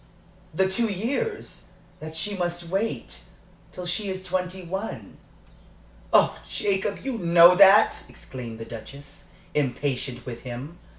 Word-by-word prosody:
"The 190 Hz, +4 st, +2 dB
two 225 Hz, +5 st, +1 dB
years 275 Hz, -, -3 dB, 0.3 s
that 155 Hz, +1 st, -8 dB
she 205 Hz, -1 st, -2 dB
must 175 Hz, -2 st, -3 dB
wait 200 Hz, +5 st, -3 dB, 0.5 s
till 180 Hz, -, -7 dB
she 195 Hz, +4 st, -1 dB
is 185 Hz, 0 st, -4 dB
twenty 185 Hz, 0 st, -3 dB
one. 190 Hz, +5 st, -6 dB, 0.9 s
Oh, -, -, +4 dB
Jacob, 200 Hz, 0 st, -1 dB
you 260 Hz, -4 st, -2 dB
know 170 Hz, 0 st, +7 dB
that!" 200 Hz, +3 st, +6 dB
exclaimed 120 Hz, -4 st, -9 dB
the 115 Hz, -, -7 dB
Duchess, 140 Hz, +6 st, -11 dB, 0.3 s
impatient 130 Hz, -2 st, -2 dB
with 120 Hz, -2 st, -7 dB
him. 130 Hz, +7 st, -8 dB
180 Hz, 125 wpm, -25 LUFS, 140-195 Hz, 0.9 s, know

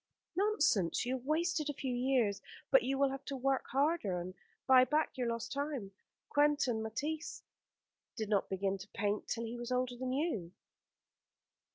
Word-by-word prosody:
"Nonsense. 295 Hz, -, +2 dB
You 255 Hz, +1 st, 0 dB
have 255 Hz, -, -13 dB
wasted 315 Hz, -1 st, +1 dB
a 290 Hz, -, -3 dB
few 265 Hz, -3 st, -2 dB
years, 245 Hz, -5 st, +1 dB, 0.3 s
but -, -, +7 dB
you 270 Hz, -7 st, -1 dB
will 275 Hz, 0 st, +3 dB
have 270 Hz, 0 st, -6 dB
to 275 Hz, -, -4 dB
work 270 Hz, +1 st, 0 dB
harder 275 Hz, -, +1 dB
and 180 Hz, +1 st, -6 dB, 0.3 s
buy 260 Hz, -1 st, +7 dB
back 300 Hz, +4 st, +1 dB
your 250 Hz, -3 st, -1 dB
lost 230 Hz, -1 st, -3 dB
time. 280 Hz, -8 st, -3 dB, 0.4 s
Quentin 290 Hz, -6 st, +2 dB
Matsys 295 Hz, +9 st, -4 dB, 0.7 s
did 220 Hz, -2 st, -2 dB
not 205 Hz, -2 st, +1 dB
begin 195 Hz, 0 st, -1 dB
to 190 Hz, -, -9 dB
paint 205 Hz, 0 st, -1 dB
till 230 Hz, 0 st, -2 dB
he 230 Hz, +1 st, -5 dB
was 240 Hz, +1 st, -5 dB
older 250 Hz, 0 st, 0 dB
than 255 Hz, +1 st, -3 dB
you." 255 Hz, -, -1 dB
255 Hz, 170 wpm, -34 LUFS, 220-290 Hz, 0.7 s, but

